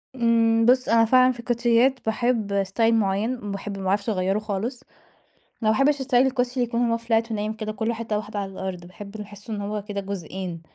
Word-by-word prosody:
امم 230 -2 +3
بُصّ، 255 +1 +4
أنا 230 0 +5
فعلًا 255 +2 +5
في 245 - -9
الكوتشيّات 240 +2 +2
باحب 220 -3 0
style 195 - -16
معين، 215 +2 0
باحب 200 0 -5
ما 195 - -6
باعرفش 200 +3 0
أغيره 195 0 0
خالص، 215 +5 -4 0.8
أنا 215 - +4
ما 220 - +1
باحبش 275 +1 +3
style 265 0 -7
الكوتشي 250 0 +3
اللي 255 -2 +1
يكون 235 0 -2
هو 230 - +2
flat 230 0 0
ونايم 215 0 -2
كده 215 -1 -5
كلّه 220 +2 -2
حتة 225 -2 -2
واحدة 210 0 -5
على 195 -1 -4
الأرض، 185 -2 -6
باحب 200 +3 -11
اللي 210 - -5
باحسّه 205 +2 -9
إنه 205 -1 -4
هو 210 +1 -3
كده 205 -1 -4
جزئين 185 -3 -6
220 Hz, 205 wpm, -24 LUFS, 200-235 Hz, 0.8 s, أنا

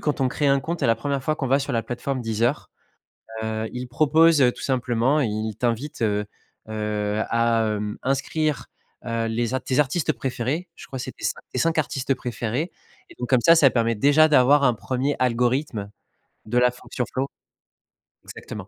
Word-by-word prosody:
quand 150 -2 -1
on 130 - +3
crée 145 +3 0
un 140 0 +4
compte 165 +5 -4
et - - +3
la 115 -1 +3
1re 140 +3 -2
fois 155 +3 0
qu'on 135 - -2
va 135 +3 +3
sur 140 - -4
la 115 -2 0
plateforme 130 +3 -3
Deezer, 115 0 -1 0.8
heu, 110 0 -2
ils 125 0 -5
proposent 155 +4 +4
heu 125 -2 +4
tout - - -11
simplement, 130 +2 +1
ils 110 -4 -2
t'invitent, 125 +3 -2
heu 105 -1 0 0.4
heu, 105 -1 -2
à, 115 -1 +2
hem, 105 0 -4
inscrire, 140 +3 -1 0.4
heu, 115 -1 -1
les 115 +2 -1
a 130 - +1
tes 130 +1 -1
artistes 150 +3 +1
préférés, 135 +7 -3
je - - -12
crois 130 - -6
c'est - - -5
tes - - -7
cin - - -2
tes - - -4
5 165 -1 +1
artistes 135 -2 -1
préférés 125 +5 -3 0.4
et - - -15
donc 125 -1 -5
comme 130 - +4
ça, 165 +7 +7
ça 145 -4 +6
permet 115 -2 +1
déjà 145 +7 +5
d'avoir 140 0 +5
un 125 - +4
1er 130 +5 -2
algorithme 125 -3 0 0.6
de 120 +3 0
la 125 0 +4
fonction 125 0 -5
flow 135 +1 -3 1.0
exactement. 105 -3 -9
125 Hz, 190 wpm, -23 LUFS, 115-140 Hz, 1.0 s, ça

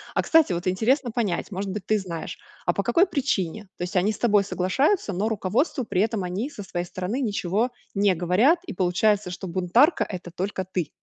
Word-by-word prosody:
А, - - +3
кстати, 320 - +4
вот 175 +1 -3
интересно 240 +7 +1
понять, 215 -5 -2
может 195 +1 -3
быть 195 -1 -5
ты 215 -1 +2
знаешь, 170 -3 -6 0.3
а - - +3
по 200 - -1
какой 240 - +3
причине? 220 - -1
То - - -11
есть 180 +2 -2
они 200 +4 +2
с - - -8
тобой 210 -4 +3
соглашаются, 205 - +1
но 195 +3 -1
руководству 225 - 0
при 185 -5 0
этом 215 -2 0
они 185 +9 -3
со 215 -9 -8
своей 175 -2 -4
стороны 185 +7 -3
ничего 220 -1 0 0.2
не 200 -2 +3
говорят 185 - +3
и - - -6
получается 185 +2 +1
что 185 +1 -6
бунтарка 190 - +3
это 180 -3 -7
только 190 +2 -3
ты. 180 -4 -3
200 Hz, 200 wpm, -25 LUFS, 180-230 Hz, 0.3 s, кстати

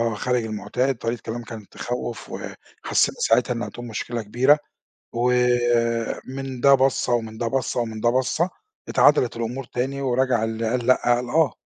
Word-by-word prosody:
آه 115 -2 +1
خارج 125 +1 0
المُعتاد، 125 +5 -1
طريق 115 +1 -2
كلام 120 +2 -6
كان 110 -3 -9
تخوّف، 120 -1 -5
وحسّينا - - -2
ساعتها 125 +2 +3
إن 115 - -3
هتقوم 120 0 -7
مشكلة 115 +1 -4
كبيرة، 130 +8 +4 0.6
ومن 120 +1 0
ده 140 - +7
بَصّة، 135 -2 +2
ومن 110 -2 -2
ده 115 -1 -1
بَصّة، 125 -1 -1
ومن 110 -2 -3
ده 120 - +3
بَصّة، 130 +8 +1 0.4
اتعدلت 130 -6 +4
الأمور 120 +3 -3
تاني 135 +4 -3
ورجع 125 -3 +1
اللي 115 0 -2
قال 120 0 -1
لأ 130 - +4
قال 120 0 -4
آه. 160 -1 +3
120 Hz, 160 wpm, -23 LUFS, 115-130 Hz, 0.6 s, ده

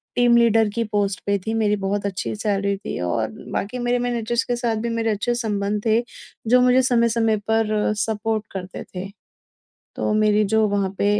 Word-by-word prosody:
Team 240 -1 +4
leader 225 -2 +4
की 230 - +1
post 205 -2 -1
पे 200 0 +2
थी। 220 - -1
मेरी 215 -2 +2
बहुत 200 +1 -1
अच्छी 195 -2 -3
सैलरी 200 -2 0
थी 195 - -6
और 110 +5 -1 0.2
बाकी 215 +5 -3
मेरे 245 0 +1
मैनेजर्स 240 0 -1
के 245 - -1
साथ 235 -1 -1
भी - - 0
मेरे 230 -1 -1
अच्छे 215 +3 -1
संबंध 210 -3 -1
थे, 225 +1 +3 0.5
जो 250 +2 +5
मुझे 250 +1 +5
समय-समय 230 -3 +2
पर 215 -1 +1
सपोर्ट 220 0 -1
करते 185 -1 -6
थे। 185 +2 -5 0.9
तो - - -1
मेरी 215 0 +3
जो 220 -1 +4
वहाँ 200 -1 0
पे - - 0
220 Hz, 180 wpm, -22 LUFS, 205-235 Hz, 0.9 s, जो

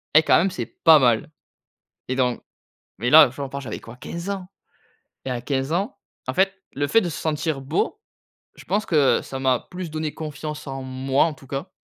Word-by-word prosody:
«Et 160 - +8
quand - - +5
même 190 +3 +3
c'est 185 - -4
pas 160 -1 +5
mal!» 125 +1 +2 0.8
Et 130 - -1
donc 125 -2 0 0.6
mais 120 +3 0
là, 155 -4 +9
j'en 140 +2 -6
parle, 140 +1 -5
j'avais 110 -5 -5
quoi, 115 +1 -12
15 170 +8 -6
ans? 190 -2 -5 0.8
Et 130 - -2
à 120 - -3
15 135 +2 -2
ans, 190 +5 -1 0.3
en 130 - -1
fait, 195 +1 +3 0.2
le 145 +1 0
fait 225 - +4
de 175 - -2
se - - -5
sentir 155 -2 -1
beau, 155 - -1 0.6
je - - -14
pense 210 +2 0
que, 145 -5 +4
heu, - - -10
ça 135 - -6
m'a 130 -2 +2
plus 180 -3 -6
donné 155 -1 -3
confiance 150 0 -6
en 135 -1 -5
moi, 130 +1 +1
en 155 - -3
tout 135 - -17
cas 135 +1 -5
145 Hz, 215 wpm, -23 LUFS, 130-165 Hz, 0.8 s, là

